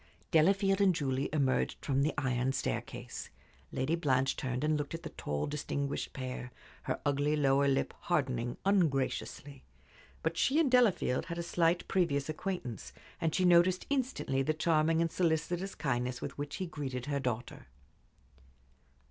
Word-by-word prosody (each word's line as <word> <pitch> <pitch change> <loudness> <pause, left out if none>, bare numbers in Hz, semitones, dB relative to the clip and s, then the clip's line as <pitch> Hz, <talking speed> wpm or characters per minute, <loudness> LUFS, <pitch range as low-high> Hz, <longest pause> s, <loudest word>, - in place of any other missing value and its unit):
Delafield 195 +4 +4
and 190 -3 +4
Julie 135 -2 -1
emerged 140 -4 0
from 135 -1 +2
the 150 +2 +1
iron 130 -1 0
staircase. 130 - -4 0.4
Lady 135 +5 -1
Blanche 135 -5 +2
turned 125 +1 -3
and 155 0 +2
looked 145 +2 -3
at 165 - -8
the 160 - -6
tall, 75 0 -3
distinguished 145 -1 -3
pair, 130 -2 -5 0.3
her - - -1
ugly 145 +1 +2
lower 140 -1 +3
lip 135 -1 +1
hardening 130 -8 -1
ungraciously. 145 -6 0 0.6
But 165 +1 -1
she 285 +4 +3
and 295 -6 +3
Delafield 230 - +3
had 170 0 -4
a 170 - -2
slight 170 0 +1
previous 155 -6 +1
acquaintance, 155 - -4 0.3
and 160 -2 +1
she 185 - +2
noticed 180 +1 +5
instantly 255 - 0
the 155 +3 0
charming 160 0 +2
and 165 - -1
solicitous 175 +3 0
kindness 125 -3 -1
with - - -5
which 145 0 -5
he 190 - -3
greeted 140 -6 -5
her 140 -1 -1
daughter. 125 -2 -4
150 Hz, 150 wpm, -32 LUFS, 135-170 Hz, 0.6 s, noticed